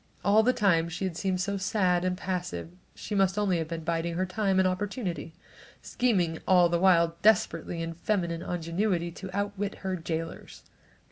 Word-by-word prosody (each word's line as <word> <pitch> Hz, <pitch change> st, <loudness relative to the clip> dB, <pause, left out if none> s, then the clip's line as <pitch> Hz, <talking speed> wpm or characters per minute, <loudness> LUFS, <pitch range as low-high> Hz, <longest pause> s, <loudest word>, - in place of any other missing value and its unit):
All 205 Hz, +3 st, +6 dB
the 245 Hz, +3 st, +3 dB
time 170 Hz, -8 st, +2 dB
she 180 Hz, +3 st, -3 dB
had 185 Hz, -3 st, -3 dB
seemed 185 Hz, 0 st, -1 dB
so 200 Hz, +1 st, -1 dB
sad 185 Hz, -3 st, +1 dB
and 185 Hz, 0 st, -1 dB
passive 180 Hz, -3 st, -4 dB, 0.2 s
she -, -, -6 dB
must 195 Hz, -1 st, +2 dB
have 210 Hz, 0 st, 0 dB
been 180 Hz, -3 st, +2 dB
only 165 Hz, +1 st, -3 dB
biding 165 Hz, +1 st, -1 dB
her 185 Hz, +2 st, 0 dB
time 195 Hz, 0 st, 0 dB
and 190 Hz, 0 st, +4 dB
opportunity, 185 Hz, -2 st, -3 dB, 0.5 s
scheming 180 Hz, -10 st, 0 dB
all 180 Hz, -2 st, +5 dB
the 170 Hz, 0 st, +1 dB
while 170 Hz, -2 st, +4 dB
desperately 190 Hz, -5 st, +2 dB
in 165 Hz, 0 st, -4 dB
feminine 170 Hz, -1 st, -1 dB
ingenuity 175 Hz, +1 st, -1 dB
to 185 Hz, +3 st, -8 dB
outwit 200 Hz, 0 st, -2 dB
her 190 Hz, -1 st, 0 dB
jailors. 165 Hz, -1 st, -5 dB
185 Hz, 175 wpm, -28 LUFS, 170-200 Hz, 0.5 s, All